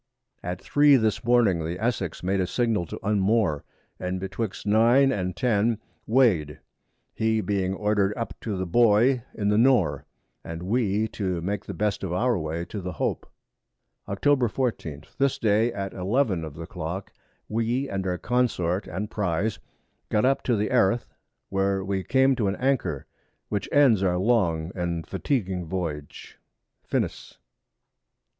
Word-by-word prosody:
At 90 0 -4
3 145 -1 +5
this 110 -2 +1
Morning 115 -8 +3
the 85 +3 -3
Essex 105 -8 -2
made 95 +2 0
a 90 - +1
Signal 110 -6 0
to - - -6
unmoar, 100 -6 +2 0.4
and 90 0 -3
betwixt 95 +2 -4
9 120 +6 +5
and 90 -6 -2
10 115 -2 +1 0.3
weigh'd, 105 - +3 0.6
he 110 0 +1
being 95 -3 -1
order'd 105 0 +1
up 115 - -3
to 105 -4 -3
the 95 - -2
Buoy 120 +6 +4
in 100 -1 0
the 105 - +3
Noar, 110 - +3 0.4
and 85 +1 -6
we 105 +1 +1
to 95 -5 -2
make 100 +3 -3
the 100 - -6
best 105 +1 -1
of 95 - -3
our 120 +7 +1
Way 80 +2 -3
to 105 - -6
the 90 0 -5
Hope. - - -2 0.8
Octob. 125 +4 +2
14. 95 - -3 0.2
This 140 -1 +2
Day 110 +2 +2
at 100 -4 -5
11 95 -1 0
of 75 -2 -9
the 85 +1 -7
Clock, 85 +5 -6 0.3
we 115 +5 -1
and 95 -3 -3
our 90 -1 -1
Consort 105 -7 0
and 100 +6 -4
Prize 100 +1 -1 0.5
got 105 +3 +2
up 135 +1 +2
to 125 - +2
Eriff 105 -1 0
[Erith], 100 +6 +3 0.4
where 95 0 0
we 95 -1 -1
came 130 +3 +3
to 105 - +1
an 95 - 0
Anchor, 135 0 -1 0.4
which 105 - -2
ends 135 -9 +5
our 90 -2 +2
long 90 -6 +1
and 85 -2 -3
fatiguing 95 - -2
Voyage. 80 -5 -5 0.5
_FINIS. - - -2
100 Hz, 155 wpm, -25 LUFS, 90-115 Hz, 0.8 s, 3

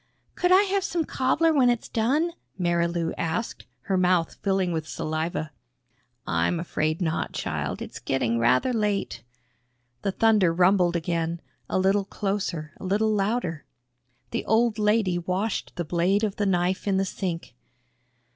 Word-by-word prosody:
"Could 360 - +1
I 380 +2 +7
have 395 -1 0
some 345 -4 -1
cobbler 310 +6 +2
when 260 -4 +4
it's 240 -2 0
done?" 280 +10 +1 0.3
Marilou 170 -1 0
asked, 170 +7 -3
her 190 - -1
mouth 180 -2 +2
filling 190 -2 +1
with 160 -1 -3
saliva. 155 0 -3 0.7
"I'm 85 - 0
afraid 160 0 -1
not, 160 -1 -1
child. - - -3
It's - - -9
getting 115 -3 0
rather 125 - +3
late." 210 - -1 0.8
The 195 - 0
thunder 210 -4 +3
rumbled 180 0 +3
again 170 0 -1 0.3
a - - 0
little 195 +1 +2
closer, 195 -7 -3
a - - -10
little 210 +4 +1
louder. 195 -6 -1 0.7
The - - -2
old 225 0 +2
lady 210 -4 +2
washed 185 +5 -2
the 175 - -3
blade 180 +6 +1
of 210 -2 -1
the 205 - +1
knife 185 +1 0
in 195 -1 +2
the 195 - +1
sink. 175 -7 -4
185 Hz, 145 wpm, -26 LUFS, 170-215 Hz, 0.8 s, I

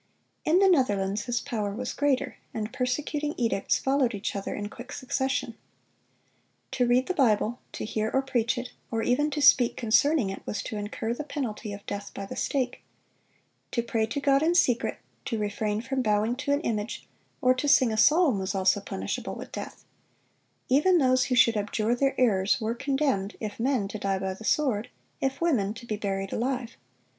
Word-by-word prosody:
In 320 +3 +4
the 390 +1 +5
Netherlands 205 - +2
his 245 -1 0
power 205 -3 -3
was 250 +2 -4
greater, 285 -2 0 0.2
and 215 0 -3
persecuting 295 +4 -2
edicts 230 -5 +1
followed 265 -4 +1
each 200 +1 -3
other 200 - -3
in 205 0 -4
quick 245 +5 -10
succession. 265 -1 -2 1.2
To 255 -2 +1
read 250 +2 +3
the 370 - -1
Bible, 240 - +2
to - - -4
hear 215 0 -1
or 270 - +1
preach 245 -2 0
it, 245 0 -5 0.2
or 225 -1 -1
even 290 +5 +2
to 295 -1 -2
speak 250 -3 +6
concerning 235 0 +3
it, 195 - -7
was 205 - -4
to - - -5
incur 210 +2 -3
the 270 - -5
penalty 240 -7 -4
of 200 0 -8
death 205 0 -6
by 195 - -5
the - - -7
stake. 255 -3 -1 0.9
To 235 - +1
pray 225 -2 0
to 285 - -3
God 275 -1 +3
in 335 +2 +2
secret, 245 -9 +2 0.3
to 230 - -2
refrain 210 +1 -2
from 260 +1 -1
bowing 215 +1 +1
to 285 +1 -2
an 285 +1 +2
image, 215 -5 -3 0.3
or 255 0 +4
to 255 +3 -2
sing 260 -5 +5
a - - -2
psalm, 300 - +4
was 190 +1 -3
also 195 +1 +2
punishable 195 -1 -4
with - - -9
death. - - -7 0.8
Even 300 +8 +4
those 255 -4 +3
who 255 - 0
should 235 -2 +5
abjure 210 +2 0
their 270 +2 0
errors, 205 -5 +3
were 225 0 -1
condemned, 265 -5 -1
if 215 -1 -5
men, 245 -4 +1
to 215 - -6
die 195 -1 0
by 190 0 -2
the 215 +4 -11
sword; 245 -8 +1 0.3
if 270 0 -1
women, 225 -12 +1
to 240 - -10
be 215 - -2
buried 195 -2 -3
alive. 250 0 -2
240 Hz, 190 wpm, -27 LUFS, 210-270 Hz, 1.2 s, speak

